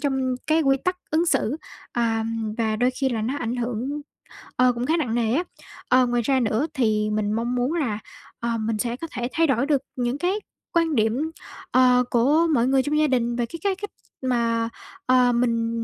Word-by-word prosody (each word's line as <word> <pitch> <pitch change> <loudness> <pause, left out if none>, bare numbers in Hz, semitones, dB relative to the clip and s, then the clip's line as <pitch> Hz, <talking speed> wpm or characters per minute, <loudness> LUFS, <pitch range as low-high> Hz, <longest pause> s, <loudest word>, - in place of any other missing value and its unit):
trong 265 -3 0
cái 315 +1 +3
quy 270 -1 +3
tắc 365 0 +1
ứng 325 +3 +2
xử, 270 -3 +1 0.4
ờm, 225 -2 -1
và 220 -2 +1
đôi 245 +3 +2
khi 265 +1 -1
là 230 -4 -2
nó 250 +6 -1
ảnh 240 -1 -2
hưởng, 245 +4 -3 0.6
ờ, 250 0 +4
cũng 240 +1 -3
khá 320 +4 +2
nặng 245 -8 -1
nề 230 -1 +1
á. 325 +7 +2 0.5
Ờ, 255 0 +5
ngoài 240 0 +1
ra 265 +2 +2
nữa 230 +4 +1
thì 215 -6 +1
mình 210 -1 0
mong 235 +2 -1
muốn 250 +5 0
là, 255 -11 -1 0.4
ờ, 235 -1 -1
mình 220 0 -1
sẽ 235 +2 -1
có 330 +6 -6
thể 240 -1 -3
thay 330 0 +3
đổi 270 0 +2
được 285 -3 +2
những 245 +1 -1
cái 355 +5 0 0.4
quan 330 -2 +2
điểm, 240 +8 +1 0.4
ờ, 250 -1 +5
của 290 +8 +4
mọi 240 -3 +3
người 265 0 +3
trong 300 +1 0
gia 305 - +4
đình 240 -3 +1
về 240 0 0
cái 335 +7 -8
cái 395 -1 +1
cách 410 +2 -6 0.3
mà, 230 -3 0 0.4
ờ, 255 -1 +4
mình 235 -1 +1
250 Hz, 210 wpm, -24 LUFS, 230-285 Hz, 0.6 s, Ờ